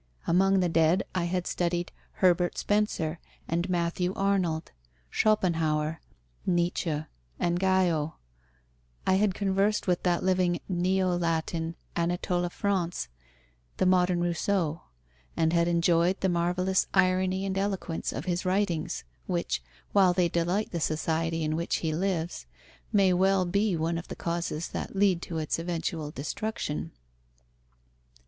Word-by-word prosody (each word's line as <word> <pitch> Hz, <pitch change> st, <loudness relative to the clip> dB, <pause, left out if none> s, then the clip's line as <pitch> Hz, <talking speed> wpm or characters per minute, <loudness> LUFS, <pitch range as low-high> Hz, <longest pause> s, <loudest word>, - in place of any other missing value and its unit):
Among 190 Hz, +2 st, +4 dB
the 180 Hz, -, +2 dB
dead, 165 Hz, +3 st, +3 dB
I 180 Hz, -2 st, 0 dB
had 180 Hz, 0 st, -1 dB
studied 175 Hz, 0 st, -1 dB, 0.2 s
Herbert 180 Hz, -1 st, +2 dB
Spencer 190 Hz, -6 st, 0 dB, 0.3 s
and 170 Hz, +3 st, -1 dB
Matthew 180 Hz, +1 st, 0 dB
Arnold, 185 Hz, -5 st, 0 dB, 0.4 s
Schopenhauer, 160 Hz, -7 st, +1 dB, 0.4 s
Nietzsche 170 Hz, -3 st, 0 dB, 0.3 s
and 175 Hz, 0 st, +1 dB
Guyau: 180 Hz, -5 st, +2 dB, 0.9 s
I 190 Hz, -, +3 dB
had 195 Hz, 0 st, +2 dB
conversed 200 Hz, +1 st, +1 dB
with 180 Hz, -2 st, +1 dB
that 175 Hz, -2 st, +1 dB
living 185 Hz, -2 st, +2 dB
Neo 185 Hz, 0 st, +1 dB
Latin, 165 Hz, -1 st, -1 dB, 0.2 s
Anatole 175 Hz, +1 st, 0 dB
France, 175 Hz, -, -1 dB, 0.7 s
the -, -, +2 dB
modern 180 Hz, -1 st, +3 dB
Rousseau, 175 Hz, -1 st, 0 dB, 0.6 s
and 160 Hz, 0 st, +2 dB
had 170 Hz, 0 st, +3 dB
enjoyed 170 Hz, +1 st, +3 dB
the 190 Hz, -, +2 dB
marvellous 180 Hz, +2 st, +1 dB
irony 185 Hz, 0 st, +2 dB
and 190 Hz, -1 st, -2 dB
eloquence 195 Hz, -4 st, -2 dB
of 140 Hz, -, -5 dB
his 180 Hz, 0 st, -1 dB
writings, 185 Hz, -, 0 dB, 0.2 s
which, -, -, -1 dB, 0.3 s
while 190 Hz, -3 st, +5 dB
they 175 Hz, -1 st, +2 dB
delight 175 Hz, +6 st, 0 dB
the 170 Hz, -, -2 dB
society 160 Hz, +1 st, 0 dB
in 155 Hz, 0 st, 0 dB
which 170 Hz, +1 st, -1 dB
he 160 Hz, -2 st, -1 dB
lives, 170 Hz, -, -2 dB, 0.4 s
may 195 Hz, -3 st, +4 dB
well 190 Hz, +1 st, +3 dB
be 200 Hz, +1 st, +1 dB
one 165 Hz, +1 st, 0 dB
of 170 Hz, -, -10 dB
the -, -, -6 dB
causes 170 Hz, -1 st, -3 dB
that -, -, -5 dB
lead 195 Hz, -3 st, +3 dB
to 165 Hz, -, -5 dB
its 155 Hz, +1 st, -1 dB
eventual 165 Hz, -2 st, -3 dB
destruction. 140 Hz, -, -4 dB
175 Hz, 130 wpm, -28 LUFS, 165-190 Hz, 0.9 s, while